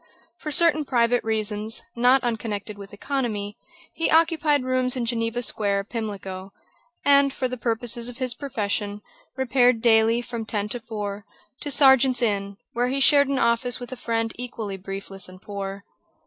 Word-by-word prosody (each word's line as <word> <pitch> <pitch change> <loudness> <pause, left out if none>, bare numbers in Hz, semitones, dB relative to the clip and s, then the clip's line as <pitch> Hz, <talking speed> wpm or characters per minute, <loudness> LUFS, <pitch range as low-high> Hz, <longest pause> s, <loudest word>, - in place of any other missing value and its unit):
For 305 - -5
certain 310 0 +3
private 245 -2 +2
reasons, 215 0 -1
not 250 +2 +4
unconnected 220 -3 -3
with 200 -1 -11
economy, 210 -3 -3 0.4
he 330 - 0
occupied 320 -3 +3
rooms 255 0 +1
in 245 -2 -2
Geneva 230 +1 -1
Square, 200 -3 0
Pimlico; 195 -4 -6 0.5
and, 280 -1 +5
for 265 -1 -2
the 255 - -5
purposes 235 0 -1
of 240 - -10
his 255 -2 -1
profession, 210 -5 -3 0.3
repaired 250 -2 +3
daily, 225 0 +4
from 235 -2 -5
ten 210 -2 -2
to 245 - 0
four, 210 -3 -5 0.4
to 290 - -3
Serjeant's 265 -3 +5
Inn, 200 -3 -1 0.2
where 245 +1 +1
he 270 +2 -1
shared 285 0 +5
an 275 0 -1
office 235 0 +2
with 245 0 -8
a - - -4
friend 230 -2 -2
equally 230 -5 -5
briefless 195 0 -4
and 185 0 -13
poor. 200 0 -6
235 Hz, 160 wpm, -24 LUFS, 205-255 Hz, 0.5 s, and